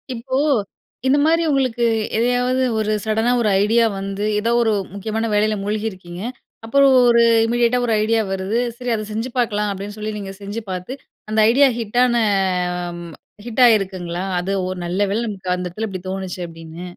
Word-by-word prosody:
இப்போ 260 +3 -4 0.7
இந்த 275 +2 +4
மாதிரி 330 +1 +3
உங்களுக்கு 255 -4 +1 0.3
எதையாவது 250 +2 +1 0.2
ஒரு 215 0 0
சடனா 220 +3 +1
ஒரு 215 - +2
ஐடியா 230 +2 +3
வந்து, 195 +1 -4 0.2
ஏதோ 230 +2 0
ஒரு 225 -2 +2 0.2
முக்கியமான 220 +3 -3
வேலையில 215 +1 +2
மூழ்கியிருக்கீங்க. 195 -4 -4 0.4
அப்புறம் 275 +3 +4 0.2
ஒரு 235 0 +5 0.2
இமீடியேட்டா 240 +1 +2
ஒரு 230 - +1
ஐடியா 225 0 +2
வருது, 195 +5 -1 0.2
"சரி 245 -1 -3
அதை 215 - -3
செஞ்சு 225 +4 -3
பார்க்கலாம்" 210 -3 0
அப்படின்னு 200 +2 -7
சொல்லி 215 0 -4
நீங்க 195 -1 -6
செஞ்சு 205 +3 -5
பார்த்து. 180 +7 -5 0.4
அந்த 220 0 0
ஐடியா 275 +3 +5
ஹிட்டான 240 +2 +2 0.9
ம். 170 -1 -9 0.3
ஹிட் 240 +2 -1
ஆயிருக்குங்களா? 185 -5 +1 0.2
அது 185 +2 -3 0.2
ஒரு, 185 0 -4
"நல்ல 180 +3 -2
வேளை 225 +3 0
நமக்கு 190 -3 -6
அந்த 180 0 -4
இடத்தில 215 +6 -4
இப்படி 185 -2 -7
தோணுச்சு" 190 -1 -5
அப்படின்னு. 165 +1 -10
215 Hz, 165 wpm, -20 LUFS, 195-235 Hz, 0.9 s, ஒரு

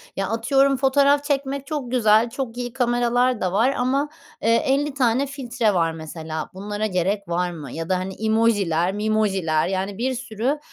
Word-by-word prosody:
Ya, 195 0 -1
atıyorum, 270 +5 +2
fotoğraf 280 +2 +3
çekmek 275 -1 -2
çok 280 -5 -4
güzel, 225 -2 +4
çok 240 -1 -5
iyi 245 -1 -4
kameralar 245 -1 +1
da 185 - 0
var 235 +7 +3
ama, 270 +4 0 0.3
eee, 230 - +3
50 280 +3 +1
tane 260 0 +2
filtre 245 -6 -1
var, 165 -3 +1
mesela. 160 0 -6
Bunlara 205 +3 -4
gerek 195 +1 -1
var 175 +1 -1
mı 150 -6 -8
ya 165 +1 -5
da, 185 - +2
hani, 185 +1 -4
emoji'ler 205 -6 +2
memoji'ler 195 -7 +1
yani, 190 +1 -2
bir 260 +3 -1
sürü, 245 +4 -2
225 Hz, 170 wpm, -22 LUFS, 190-265 Hz, 0.3 s, güzel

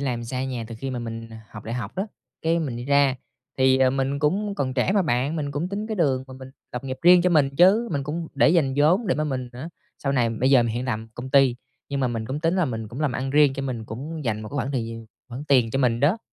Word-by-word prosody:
làm 125 -4 -2
xa 130 +2 -3
nhà 125 -3 -4
từ 115 - -7
khi 135 +2 -4
mà 125 - -3
mình 115 -1 -6 0.2
học 110 - -10
đại 115 - -4
học 120 -3 -4
á. 190 +3 -1 0.4
Cái 165 +1 +2
mình 140 -8 -3
đi 120 - -6
ra, 140 -1 +3 0.4
thì, 130 0 +4
ờ, 130 -1 +4
mình 135 +1 -1
cũng 200 +8 0
còn 130 -6 -2
trẻ 130 +8 +1
mà 200 -1 +3
bạn, 140 0 0
mình 145 -2 -2
cũng 145 +5 -3
tính 200 +2 -4
cái 220 - -3
đường 135 -7 +1
mà 130 - -11
mình 130 0 -11 0.2
lập 125 +2 -5
nghiệp 130 -1 -4
riêng 175 0 +7
cho 180 - +2
mình 150 -5 +4
chứ! 200 +8 +5
Mình 140 -2 -1
cũng 160 +4 -4
để - - +4
dành 160 -5 +3
vốn 170 +10 +3
để 175 - +2
mà 155 - -1
mình 130 -4 -3
hả 130 +6 -7 0.3
sau 140 - -1
này 120 -4 +2
bây 120 +4 +1
giờ 130 -3 +6
mình 115 -1 -1
hiện 125 - -2
làm 115 -3 -3
công 130 +2 -7
ty, 135 -3 +4 0.3
nhưng 140 -1 -2
mà 130 - +1
mình 115 -2 -3
cũng 135 +5 -4
tính 165 +4 +1
là 180 - +3
mình 115 -5 -4
cũng 120 +7 -7
làm 150 -4 +1
ăn 135 +2 -3
riêng, 145 -1 +5
cho 135 - -4
mình 125 -4 -4
cũng 145 +7 -6
dành 110 -2 -1
một 110 - -7
cái - - -11
khoảng 130 0 -1
thời 120 -4 -1
giờ 115 0 -6 0.3
khoản 125 +4 -7
tiền 125 -6 +3
cho 135 - -1
mình 120 -3 +2
đó. 155 - +3
135 Hz, 290 wpm, -24 LUFS, 125-150 Hz, 0.4 s, riêng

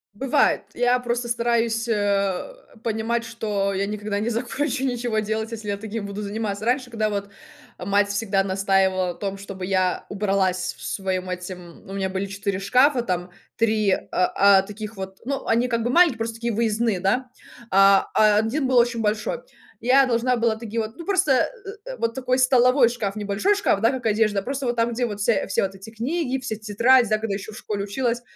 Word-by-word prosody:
Бывает. 270 +5 +2
Я 245 +1 +2
просто 240 0 -2
стараюсь, 235 -1 0
э, 200 - 0 0.3
понимать, 230 +1 -1
что 210 -4 -2
я 200 +1 -1
никогда 205 -1 -3
не 225 +3 -1
закончу 255 +3 -2
ничего 240 -3 -1
делать, 220 +1 -2
если 215 -2 -6
я 200 - -1
таким 220 0 -5
буду 200 +1 -5
заниматься. 210 0 -3
Раньше, 250 0 0
когда 215 -2 0
вот 200 -1 -3 0.5
мать 200 +2 +1
всегда 200 -2 0
настаивала 190 -1 +1
на 175 - -3
том, 195 -1 -4
чтобы 195 -2 -7
я 185 -1 0
убралась 190 -3 0
в - - -13
своем 185 -2 -3
этим, 180 -1 -8
у - - -7
меня 190 -1 -2
были 190 +1 -3
4 200 -1 -3
шкафа 255 +6 +3
там 180 -4 -3 0.3
3, 215 -3 +2
э, - - +3
э, 195 +1 +4
таких 210 0 -8
вот, 190 0 -7
ну, 275 0 -3
они 235 +2 +2
как 230 -2 -1
бы 240 - -1
маленькие, 320 -6 +4
просто 225 0 -3
такие 235 0 -2
выездные, 220 -2 0
да. 250 +7 0 0.4
Э, 195 0 +6
а 210 -1 +5
1 255 +6 0
был 255 -1 +2
очень 235 -1 +3
большой. 215 - -1 0.4
Я 265 +3 +5
должна 245 0 +1
была 230 -1 +1
такие 230 0 -4
вот, 220 +2 -4
ну 335 - -9
просто, 325 -9 +2 0.4
э, - - -7
вот 230 0 -1
такой 255 0 0
столовой 255 0 +5
шкаф, 215 -4 -3
небольшой 210 - +1
шкаф, 390 - +1
да, 230 - +4
как 260 -3 -4
одежда, 210 -2 +2
просто 275 0 -3
вот 240 - 0
там 230 0 +1
где 245 +1 0
вот 205 -1 -6
вся 215 -1 +1
все - - +1
вот 195 0 -2
эти 195 +3 -11
книги, 265 +4 -2
все 230 -4 -4
тетради, 230 +3 +3
да, 215 - +3
когда 215 -2 -3
ещё 200 +2 -5
в 215 - -10
школе 205 -1 -4
училась. 240 +3 -1
220 Hz, 195 wpm, -23 LUFS, 200-240 Hz, 0.5 s, Э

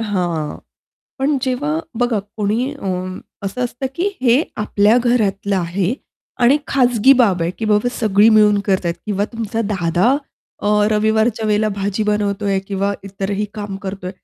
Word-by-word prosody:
हां. 175 -8 -2 0.6
पण 280 +2 +1
जेव्हा 285 +4 -1 0.2
बघा 240 -3 +1 0.2
कोणी 220 +6 0
अ, 280 -9 -8 0.6
असं 225 +6 -2
असतं 245 +2 -4
की 365 +4 0
हे 255 +3 +4
आपल्या 210 +1 +3
घरातलं 205 -5 +1
आहे 180 +4 -1 0.5
आणि 250 +4 +6
खाजगी 250 -1 +4
बाब 210 -10 +3
आहे, 165 - 0
की 205 +5 -6
बाबा 210 +2 +2
सगळी 210 -1 +4
मिळून 210 -2 +5
करतायत 185 -4 +1
किंवा 205 -1 0
तुमचा 225 -1 -3
दादा 185 +6 +2 0.5
अ, - - -2 0.2
रविवारच्या 220 +1 +1
वेळेला 215 0 +2
भाजी 200 +1 -1
बनवतोय 205 -1 0
किंवा 200 0 0
इतरही 200 +1 -3
काम 205 -2 -5
करतोय, 190 -2 -5
210 Hz, 145 wpm, -18 LUFS, 195-240 Hz, 0.6 s, आणि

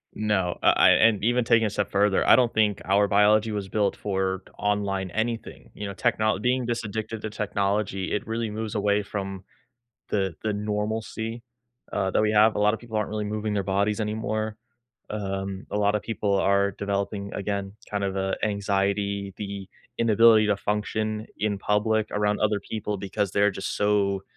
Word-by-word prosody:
No, 105 -5 0
I - - +6
I - - +6
and 110 -3 +4
even 120 +2 +2
taking 115 -2 +4
a - - -1
step 105 0 -2
further, 100 0 +2
I - - +8
don't 120 -1 +3
think 105 -2 +1
our 100 +1 +3
biology 105 +2 +4
was 100 -2 -4
built 105 +1 +1
for 95 -2 -2 0.2
online 100 -2 -1
anything, 110 - -3
you 105 - -5
know, 100 - -5
technol 110 +1 +1
being 125 +2 +1
this 120 0 -2
addicted 110 +1 -4
to 110 - -4
technology, 100 -2 -1
it 105 - -1
really 115 0 -2
moves 110 +1 -4
away 105 -1 +1
from 95 -2 -5 0.7
the 95 -4 0
the 110 -1 -1
normalcy, 110 +2 -3 0.5
uh, 95 -1 0
that - - +3
we 110 0 +2
have. 110 +1 +5
A - - -1
lotta 105 +2 +3
people 115 -2 -7
aren't 105 -1 -1
really 105 -1 -2
moving 105 0 -2
their 100 -1 0
bodies 100 +3 0
anymore. 110 0 -2 0.5
Um, 95 -2 -4
a - - -2
lotta 105 +1 +2
people 105 -2 -1
are 100 +1 +3
developing, 100 0 -3
again, 100 -1 -3 0.2
kinda 100 -1 -1
of, 95 - -5
uh, 95 0 0
anxiety, 100 -1 -1
the 100 -2 -6 0.3
inability 115 -1 +5
to 105 -1 +2
function 105 +1 -2
in 105 -2 -1
public 105 +2 +1
around 105 0 0
other 105 -1 +2
people 105 0 -4
because 100 0 -2
they're 100 +1 +3
just 95 0 -4
so 100 -2 +1
105 Hz, 175 wpm, -25 LUFS, 100-110 Hz, 0.7 s, I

